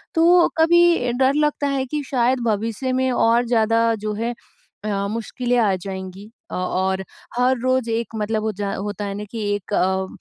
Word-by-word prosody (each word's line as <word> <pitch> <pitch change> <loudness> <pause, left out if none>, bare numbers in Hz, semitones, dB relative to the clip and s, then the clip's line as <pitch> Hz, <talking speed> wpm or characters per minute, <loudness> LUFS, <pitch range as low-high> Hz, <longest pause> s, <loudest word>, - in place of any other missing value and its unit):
तो 340 +2 +5
कभी 335 -5 +4
डर 265 +2 +3
लगता 295 -1 +1
है 270 -1 -1
कि 295 +2 -3
शायद 255 0 +2
भविष्य 225 +4 -1
में 260 0 +1
और 235 0 +3
ज़्यादा 230 0 +2
जो 210 - -1
है 230 +3 -2 0.5
अ, 200 -2 -1
मुश्किलें 240 +3 -2
आ 210 -5 +3
जाएँगी। 190 +2 -7 0.2
अ, - - -4
और 190 +1 -1 0.3
हर 255 +1 +3
रोज़ 255 -1 +1
एक 225 0 -2
मतलब 215 0 -1
हो 220 - 0
जा 200 -1 -4
होता 205 +1 -4
है 200 - -3
ना 205 - -5
कि 230 - -5 0.2
एक 205 0 -7
अ, 190 0 +1
230 Hz, 180 wpm, -21 LUFS, 205-260 Hz, 0.5 s, तो